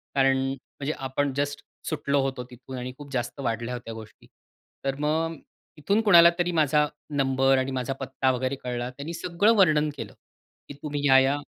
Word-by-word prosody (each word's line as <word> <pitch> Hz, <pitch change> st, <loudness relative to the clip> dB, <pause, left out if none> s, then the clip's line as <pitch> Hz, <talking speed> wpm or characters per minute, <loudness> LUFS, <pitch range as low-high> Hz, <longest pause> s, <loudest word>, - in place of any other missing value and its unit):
कारण 135 Hz, -1 st, +4 dB
म्हणजे 135 Hz, +2 st, -5 dB
आपण 140 Hz, +1 st, -1 dB
जस्ट 145 Hz, 0 st, -2 dB, 0.3 s
सुटलो 140 Hz, -3 st, 0 dB
होतो 135 Hz, -2 st, -2 dB
तिथून 130 Hz, +1 st, -10 dB
आणि 125 Hz, +1 st, -5 dB
खूप 145 Hz, -1 st, -11 dB
जास्त 120 Hz, +1 st, -3 dB
वाढल्या 115 Hz, -2 st, -2 dB
होत्या 120 Hz, -2 st, -6 dB
गोष्टी. 110 Hz, -1 st, -12 dB, 0.6 s
तर 135 Hz, 0 st, 0 dB
मग 160 Hz, +2 st, 0 dB, 0.4 s
इथून 200 Hz, +8 st, +1 dB
कुणाला 170 Hz, -6 st, +8 dB
तरी 175 Hz, 0 st, +1 dB
माझा 150 Hz, -2 st, +3 dB, 0.2 s
नंबर 135 Hz, -1 st, +2 dB
आणि 130 Hz, +1 st, -1 dB
माझा 130 Hz, 0 st, -2 dB
पत्ता 135 Hz, -1 st, 0 dB
वगैरे 130 Hz, +2 st, -1 dB
कळला. 125 Hz, 0 st, -3 dB
त्यांनी 140 Hz, +6 st, -7 dB
सगळं 180 Hz, +6 st, +2 dB
वर्णन 155 Hz, -6 st, +4 dB
केलं, -, -, -7 dB, 0.5 s
की 145 Hz, -, -8 dB
तुम्ही 145 Hz, -1 st, -3 dB
ह्या-ह्या 135 Hz, +1 st, +5 dB
135 Hz, 165 wpm, -26 LUFS, 130-150 Hz, 0.6 s, कुणाला